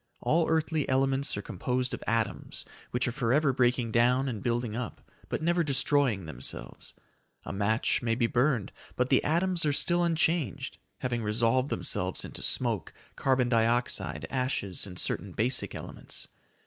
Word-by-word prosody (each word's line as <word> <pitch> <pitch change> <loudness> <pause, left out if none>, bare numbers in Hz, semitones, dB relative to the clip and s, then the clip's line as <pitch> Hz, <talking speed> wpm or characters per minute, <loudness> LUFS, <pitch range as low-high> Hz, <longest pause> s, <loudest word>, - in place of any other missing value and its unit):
All 165 +1 +2
earthly 160 -2 +1
elements 135 -1 +1
are 100 - -4
composed 125 +5 -2
of - - -5
atoms 115 -3 -1 0.2
which 125 0 0
are - - 0
forever 135 +3 +2
breaking 125 -2 +2
down 125 +4 +3
and 115 -5 -3
building 120 -2 -1
up, 120 -1 -6 0.2
but - - -2
never 175 +1 +2
destroying 135 - +2
themselves. 65 -5 -6 0.5
A - - -5
match 105 +4 +1
may 115 -2 +1
be 120 0 +2
burned, 125 -2 +1 0.2
but 125 +1 0
the 130 - +4
atoms 175 +2 +1
are 150 - +3
still 175 +4 +3
unchanged, 165 -2 0 0.2
having 120 -2 -1
resolved 115 +5 +2
themselves - - -1
into - - -7
smoke, 115 -10 +1 0.2
carbon 130 -2 +2
dioxide, 115 -10 +1
ashes, 125 -8 -1
and 90 -2 -9
certain 95 0 -2
basic 120 +7 +1
elements. - - -7
125 Hz, 150 wpm, -29 LUFS, 115-140 Hz, 0.5 s, the